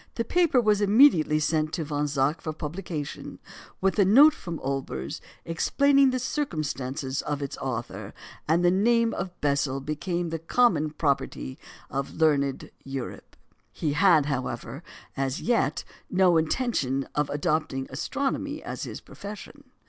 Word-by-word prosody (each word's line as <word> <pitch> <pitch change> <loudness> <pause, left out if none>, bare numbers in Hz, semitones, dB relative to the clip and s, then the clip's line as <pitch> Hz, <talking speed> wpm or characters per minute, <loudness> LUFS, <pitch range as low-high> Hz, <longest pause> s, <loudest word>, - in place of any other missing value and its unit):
The 230 - -1
paper 340 -7 +3
was 210 -3 +3
immediately 200 - +5
sent 155 0 0
to 170 - -1
Von 145 0 -1
Zach 140 +2 0
for 155 - -4
publication, 155 -1 -6 0.4
with 195 +2 +1
a - - +7
note 275 +11 +7
from 170 - -6
Olbers 130 - -4 0.2
explaining 275 +11 +3
the 255 - 0
circumstances 145 - -3
of 145 -1 -3
its 140 - -4
author; 120 -3 -4 0.4
and 170 +3 +3
the 175 - +5
name 230 +4 +3
of 180 0 -5
Bessel 140 -2 +1
became 170 +5 -3
the 165 0 -3
common 165 -3 +2
property 140 - -2 0.3
of 135 +1 -3
learned 140 -4 +1
Europe. 135 -2 -7 0.4
He 150 -3 -2
had, 165 -2 +5
however, 135 -3 -4 0.3
as 135 -1 -1
yet 235 -1 0 0.3
no 185 -2 +4
intention 160 - 0
of 150 -1 0
adopting 145 -3 -1
astronomy 280 - -3
as - - -5
his - - -7
profession. 210 +8 -10
160 Hz, 140 wpm, -26 LUFS, 140-205 Hz, 0.4 s, a